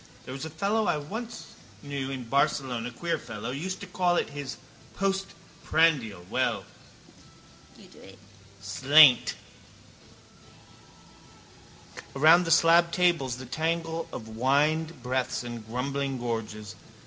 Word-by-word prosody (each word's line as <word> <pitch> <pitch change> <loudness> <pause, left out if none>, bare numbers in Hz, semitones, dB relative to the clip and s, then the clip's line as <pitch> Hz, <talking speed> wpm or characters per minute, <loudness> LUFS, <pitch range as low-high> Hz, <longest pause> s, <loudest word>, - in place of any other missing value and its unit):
There 130 - -7
was 135 +3 -6
a - - -5
fellow 200 +7 0
I - - +2
knew 150 - -6
once 230 +1 -6 0.4
in 135 -2 -4
Barcelona, 125 -2 0
queer 165 +8 -3
fellow, 115 +3 -6
used 175 +8 -4
to - - -6
call 180 -1 +1
it - - -1
his 145 -2 -6 0.4
postprandial. 165 - 0
Well: 115 -3 -1 1.9
slainte! 130 - +5 2.8
Around 160 +5 +6
the - - -3
slabbed 170 +1 +5
tables 170 -9 +2
the 130 - -8
tangle 165 +4 -2
of 110 - -7
wined 145 +6 0
breaths 125 0 -1
and 120 -2 -7
grumbling 135 +3 -2
gorges. 110 -3 -5
140 Hz, 110 wpm, -27 LUFS, 125-165 Hz, 2.8 s, Around